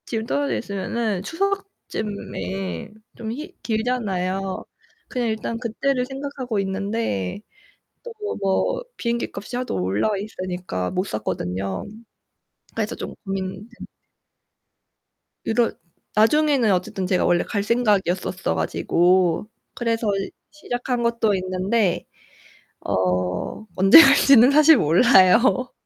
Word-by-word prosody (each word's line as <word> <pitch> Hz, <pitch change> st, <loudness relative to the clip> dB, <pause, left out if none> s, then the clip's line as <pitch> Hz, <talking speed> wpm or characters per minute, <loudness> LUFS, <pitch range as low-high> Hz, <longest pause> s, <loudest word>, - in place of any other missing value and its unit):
지금 225 Hz, -2 st, -3 dB
떨어져 285 Hz, +4 st, -1 dB
있으면은 205 Hz, -1 st, -3 dB
추석쯤에 205 Hz, -, -4 dB, 0.3 s
좀 220 Hz, -1 st, -5 dB
힐 305 Hz, +10 st, -7 dB
길잖아요. 195 Hz, -5 st, -2 dB, 0.4 s
그냥 245 Hz, -2 st, -2 dB
일단 220 Hz, +1 st, -3 dB
그때를 250 Hz, +2 st, -1 dB
생각하고 270 Hz, -4 st, -4 dB
있는데 195 Hz, -, -2 dB, 0.6 s
또 480 Hz, -, -8 dB, 0.3 s
뭐 -, -, 0 dB
비행기값이 235 Hz, -1 st, -3 dB
하도 250 Hz, 0 st, -3 dB
올라와 100 Hz, -, 0 dB
있으니까 180 Hz, -, -4 dB
못 185 Hz, -, 0 dB
샀거든요. 95 Hz, -, -3 dB, 0.9 s
그래서 -, -, -2 dB
좀 -, -, -7 dB
고민 195 Hz, +1 st, -4 dB
되 240 Hz, -, -12 dB, 1.6 s
이런 230 Hz, +1 st, +1 dB, 0.4 s
나중에는 265 Hz, +1 st, +3 dB
어쨋든 185 Hz, 0 st, -1 dB
제가 185 Hz, -1 st, +1 dB
원래 175 Hz, 0 st, +3 dB
갈 200 Hz, -2 st, -2 dB
생각이었었어 200 Hz, -5 st, 0 dB
가지고 180 Hz, +1 st, +2 dB, 0.3 s
그래서 230 Hz, -1 st, -1 dB, 0.4 s
시작한 245 Hz, -4 st, -3 dB
것도 235 Hz, -2 st, +1 dB
있는데 185 Hz, +1 st, 0 dB, 0.8 s
어 90 Hz, -, -1 dB
언제 195 Hz, -, +9 dB
갈지는 275 Hz, -3 st, +6 dB
사실 305 Hz, +2 st, +7 dB
몰라요. 230 Hz, -, +4 dB
215 Hz, 245 characters per minute, -22 LUFS, 185-245 Hz, 1.6 s, 언제